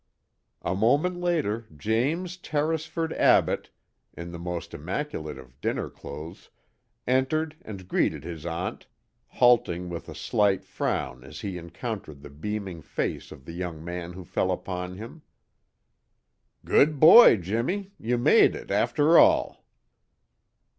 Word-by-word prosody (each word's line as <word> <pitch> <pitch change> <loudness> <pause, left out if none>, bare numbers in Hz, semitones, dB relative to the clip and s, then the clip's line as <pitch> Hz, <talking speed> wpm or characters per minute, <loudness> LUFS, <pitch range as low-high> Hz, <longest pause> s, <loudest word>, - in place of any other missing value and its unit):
A - - -1
moment 140 - +2
later 115 -11 -1
James 140 - -1
Tarrisford 160 -1 -2
Abbott, - - +3 0.5
in 85 0 -7
the 85 - -8
most 85 0 -5
immaculate 80 - -4
of 65 +1 -15
dinner - - -2
clothes, 75 +4 -10 0.6
entered 150 +5 0
and 95 -4 -9
greeted - - 0
his 85 -3 -7
aunt, 85 +1 -4 0.4
halting 90 -8 +2
with 85 -1 -7
a - - -8
slight 100 -2 +1
frown 65 -8 -3
as 70 - -10
he 100 -4 -4
encountered 85 - -7
the 75 - -10
beaming 95 +2 -5
face - - -4
of 65 - -12
the 85 - -8
young 85 -3 -5
man 90 0 -5
who 95 +1 -9
fell 95 - -1
upon 90 0 -4
him. 115 +9 -10 1.4
"Good 150 0 +3
boy, 170 - +9
Jimmie! 120 - -2
You 120 +2 0
made 120 - +5
it, - - -8
after 155 +3 +4
all!" 315 0 +3
100 Hz, 130 wpm, -26 LUFS, -, 1.4 s, boy